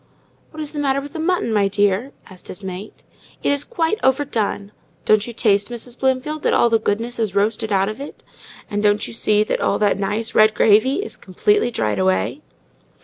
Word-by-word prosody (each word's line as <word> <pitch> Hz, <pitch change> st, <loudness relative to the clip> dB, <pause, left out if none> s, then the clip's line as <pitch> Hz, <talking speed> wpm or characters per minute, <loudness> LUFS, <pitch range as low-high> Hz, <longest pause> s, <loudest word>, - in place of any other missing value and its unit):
"What 310 Hz, -1 st, -6 dB
is 295 Hz, -, -6 dB
the 295 Hz, -, -4 dB
matter 275 Hz, -1 st, +1 dB
with 285 Hz, +1 st, -9 dB
the 325 Hz, -, -5 dB
mutton, 325 Hz, -8 st, 0 dB
my 205 Hz, -2 st, +3 dB
dear?" 205 Hz, +5 st, +1 dB, 0.2 s
asked 185 Hz, -2 st, -11 dB
his 195 Hz, -, -8 dB
mate. 190 Hz, +2 st, -8 dB, 0.4 s
"It -, -, +2 dB
is 285 Hz, 0 st, 0 dB
quite 350 Hz, -1 st, -1 dB
overdone. 245 Hz, -7 st, 0 dB, 0.3 s
Don't 215 Hz, +1 st, +3 dB
you -, -, -5 dB
taste, 205 Hz, -3 st, +2 dB
Mrs. 240 Hz, +1 st, -6 dB
Bloomfield, 265 Hz, +4 st, -1 dB
that -, -, +2 dB
all 235 Hz, -, +3 dB
the 225 Hz, -, +4 dB
goodness 230 Hz, +3 st, -2 dB
is 215 Hz, -4 st, -1 dB
roasted 215 Hz, +2 st, 0 dB
out 195 Hz, -1 st, +2 dB
of 215 Hz, +5 st, -5 dB
it? 285 Hz, -, -9 dB, 0.4 s
And 205 Hz, 0 st, -2 dB
can't 205 Hz, 0 st, +2 dB
you 120 Hz, -, -8 dB
see 210 Hz, -, +2 dB
that -, -, -2 dB
all -, -, +1 dB
that 205 Hz, -2 st, +1 dB
nice, 210 Hz, +3 st, -2 dB
red 215 Hz, 0 st, +5 dB
gravy 225 Hz, -, +3 dB
is -, -, -6 dB
completely 415 Hz, -, +1 dB
dried 105 Hz, -, -1 dB
away?" 95 Hz, 0 st, 0 dB
220 Hz, 200 wpm, -20 LUFS, 205-270 Hz, 0.4 s, red